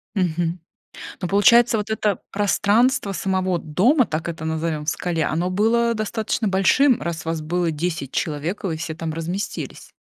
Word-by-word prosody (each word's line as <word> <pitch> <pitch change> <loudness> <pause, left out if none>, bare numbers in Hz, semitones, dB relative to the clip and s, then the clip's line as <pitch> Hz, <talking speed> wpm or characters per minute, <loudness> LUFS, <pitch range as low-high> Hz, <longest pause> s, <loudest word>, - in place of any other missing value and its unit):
Мгм, 175 -2 0 0.6
но 180 - -2
получается, 235 +4 +5
вот 210 0 -3
это 210 -3 0
пространство 205 +3 +2
самого 185 -1 0
дома, 215 - +2
так 160 +2 -3
это 160 -1 -5
назовём, 160 -1 -2
в - - -10
скале, 165 -1 -1
оно 170 +4 -1
было 230 +4 +2
достаточно 215 0 -2
большим, 225 +7 +3
раз 165 0 -4
вас 165 -1 -2
было 170 +1 0
10 155 -3 -3
человек 160 +7 -3
и - - +1
вы 160 - -2
все 160 0 -5
там 160 0 -4
разместились. 170 +5 -5
180 Hz, 160 wpm, -22 LUFS, 165-210 Hz, 0.6 s, получается